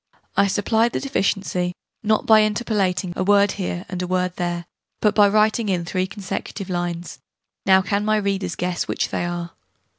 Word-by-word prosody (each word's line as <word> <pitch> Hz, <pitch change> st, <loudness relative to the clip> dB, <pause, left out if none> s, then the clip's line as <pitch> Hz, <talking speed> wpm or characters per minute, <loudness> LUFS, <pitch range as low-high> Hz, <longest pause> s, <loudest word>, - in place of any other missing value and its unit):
I 200 Hz, -, +4 dB
supplied 220 Hz, +4 st, +1 dB
the -, -, 0 dB
deficiency, 195 Hz, -8 st, -1 dB, 0.3 s
not 215 Hz, 0 st, +1 dB
by 220 Hz, -1 st, +7 dB
interpolating 205 Hz, -5 st, 0 dB
a -, -, -1 dB
word 200 Hz, 0 st, +4 dB
here 180 Hz, -2 st, -4 dB
and 180 Hz, -1 st, -4 dB
a 180 Hz, -, -2 dB
word 180 Hz, 0 st, 0 dB
there, 175 Hz, -1 st, -2 dB, 0.3 s
but 210 Hz, -1 st, +3 dB
by 205 Hz, -1 st, +6 dB
writing 215 Hz, +1 st, +2 dB
in 175 Hz, -3 st, 0 dB
3 185 Hz, +2 st, -1 dB
consecutive 195 Hz, -1 st, -5 dB
lines. 175 Hz, -3 st, -3 dB, 0.5 s
Now 190 Hz, 0 st, +6 dB
can 200 Hz, +2 st, 0 dB
my 215 Hz, 0 st, +2 dB
readers 195 Hz, -3 st, -1 dB
guess 180 Hz, -1 st, -2 dB
which -, -, -1 dB
they -, -, -2 dB
are? 175 Hz, -1 st, -4 dB
190 Hz, 175 wpm, -22 LUFS, 180-210 Hz, 0.5 s, by